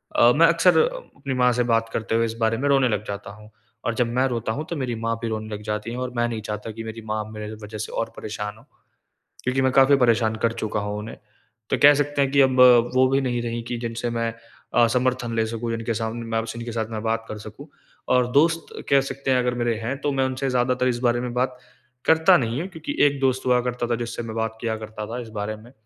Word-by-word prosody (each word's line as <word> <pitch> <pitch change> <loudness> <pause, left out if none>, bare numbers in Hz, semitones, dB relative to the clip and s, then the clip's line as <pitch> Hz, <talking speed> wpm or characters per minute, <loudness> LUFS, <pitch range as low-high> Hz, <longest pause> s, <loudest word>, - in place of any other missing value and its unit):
अ, 120 - +6
मैं 165 +2 +6
अक्सर 170 +2 +4
अपनी 470 - -4
माँ 125 -1 +3
से 120 +1 +1
बात 115 0 +1
करते 110 0 -1
हुए 115 0 +3
इस 115 - -3
बारे 115 0 +1
में 140 +4 -1
रोने 135 -2 +4
लग 105 -2 -1
जाता 100 0 -6
हूँ। 105 +1 -14 0.4
और 120 - +1
जब 120 0 +1
मैं 130 +2 +2
रोता 115 -3 -2
हूँ 150 +7 -3
तो 170 - -3
मेरी 125 -4 -2
माँ 115 0 -1
भी 115 - -2
रोने 110 -1 -3
लग 105 - -8
जाती 105 +2 -3
हैं। 120 - -5
और 125 0 -3
मैं 120 0 +1
नहीं 115 -2 -4
चाहता 105 +1 -5
कि 115 +1 -7
मेरी 110 0 -7
माँ 110 0 -2
मेरे 105 0 -6
वज़ह 105 +1 -7
से 110 - -5
और 115 - -2
परेशान 105 0 -5
हो, - - -18 0.8
क्योंकि 130 +2 0
मैं 130 0 +3
काफ़ी 135 +1 +6
परेशान 115 -3 +3
कर 115 - +3
चुका 110 -2 -2
हूँ 105 0 -3
उन्हें। 110 +2 -8 0.5
तो - - +1
कह 145 +1 +10
सकते 145 0 0
हैं 135 -1 +1
कि 140 0 +5
अब 130 -1 +3 0.4
वो 130 0 +5
भी 135 +1 +2
नहीं 120 -2 -1
रहीं 115 0 -3
कि 120 0 -3
जिनसे 115 0 -3
मैं 115 -1 -2 0.4
अ, 120 - +5
समर्थन 125 0 0
ले 110 0 +2
सकूँ, 115 +1 -4
जिनके 115 0 -2
सामने 115 +1 -3
मैं 115 0 -1
जिनके 115 +1 -5
साथ 110 -1 -2
मैं 110 -1 -4
बात 115 0 -1
कर 110 - -5
सकूँ। 110 +8 -10 0.5
और 125 -1 +3
दोस्त 165 +3 +3 0.2
कह 140 -1 +5
सकते 135 0 -3
हैं 130 - +4
अगर 125 0 0
मेरे 120 -1 0
हैं 120 +4 -3
तो 145 - 0
मैं 135 -1 +1
उनसे 130 +1 -2
ज़्यादातर 125 0 +1
इस 120 -1 -1
बारे 120 0 +1
में 125 -1 -4
बात 125 +1 -1 0.5
करता 160 +3 +6
नहीं 120 +1 -1
हूँ 180 - -4
क्योंकि 160 -4 -6
एक 140 -1 -2
दोस्त 130 -1 +1
हुआ 125 -1 +4
करता 120 -1 -3
था 120 - +2
जिससे 115 - -5
मैं 110 -1 -6
बात 110 0 -2
किया 115 -2 -1
करता 110 0 -7
था 120 +3 -5
इस 115 - -9
बारे 105 +1 -3
में। 115 +3 -15
120 Hz, 255 wpm, -23 LUFS, 110-130 Hz, 0.8 s, कह